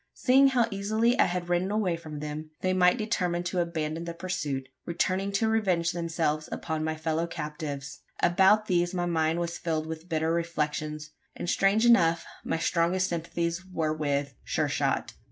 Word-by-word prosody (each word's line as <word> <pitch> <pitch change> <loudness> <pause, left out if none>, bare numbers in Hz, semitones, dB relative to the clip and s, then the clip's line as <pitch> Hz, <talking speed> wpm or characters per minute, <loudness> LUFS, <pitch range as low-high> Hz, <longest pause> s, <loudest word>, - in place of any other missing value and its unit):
Seeing 270 +2 +5
how 245 -4 +3
easily 215 +4 +1
I - - +7
had 175 0 -2
ridden 175 +2 +1
away 205 -4 +1
from 155 -3 -8
them, 150 +1 -5
they 185 0 +1
might 180 +3 +4
determine 180 -6 -1
to 180 +1 -2
abandon 165 -1 -2
the 170 0 -5
pursuit 150 -7 -3 0.2
returning 185 +3 -1
to 220 +3 +2
revenge 185 -7 +1
themselves 165 -3 -1
upon 160 -2 -3
my 160 0 -1
fellow 160 +1 -1
captives. 150 -3 -5 0.2
About 190 +5 +4
these 175 -2 +1
my 175 -1 0
mind 165 -1 +1
was 170 0 -3
filled 160 -2 -1
with, 160 +2 -7
bitter 160 0 +1
reflections; 155 -2 -2 0.2
and - - -5
strange 195 +5 +3
enough, 170 -9 +4 0.2
my - - -1
strongest 175 +3 +1
sympathies 170 +1 -2
were 165 -4 -2
with. 145 -2 -1
Sure - - 0
shot! - - -1
170 Hz, 170 wpm, -28 LUFS, 155-185 Hz, 0.2 s, I